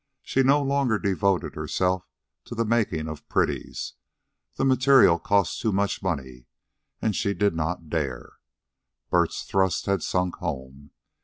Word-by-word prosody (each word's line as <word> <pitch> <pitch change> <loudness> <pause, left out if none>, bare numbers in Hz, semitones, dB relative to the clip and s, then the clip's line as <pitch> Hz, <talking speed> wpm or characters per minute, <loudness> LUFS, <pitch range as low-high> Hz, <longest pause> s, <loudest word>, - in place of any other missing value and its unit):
She 135 - +1
no 140 +2 +4
longer 135 -5 +1
devoted 100 -2 0
herself 90 -1 -1 0.4
to - - -7
the 115 0 0
making 105 -9 0
of 80 -2 -8
pretties. - - -1 0.6
The - - 0
materials 130 -9 +5
cost 100 -2 +1 0.4
money, 65 -9 -4 0.6
and 110 -3 +1
she 100 +2 0
did 105 -3 +2
not 80 +1 -3
dare. 70 -6 -4 0.7
Bert's 85 -2 +1
thrust 95 -3 0
had 100 -3 +1
sunk 90 +1 -1
home. 70 -3 -6
95 Hz, 130 wpm, -25 LUFS, 80-110 Hz, 0.7 s, materials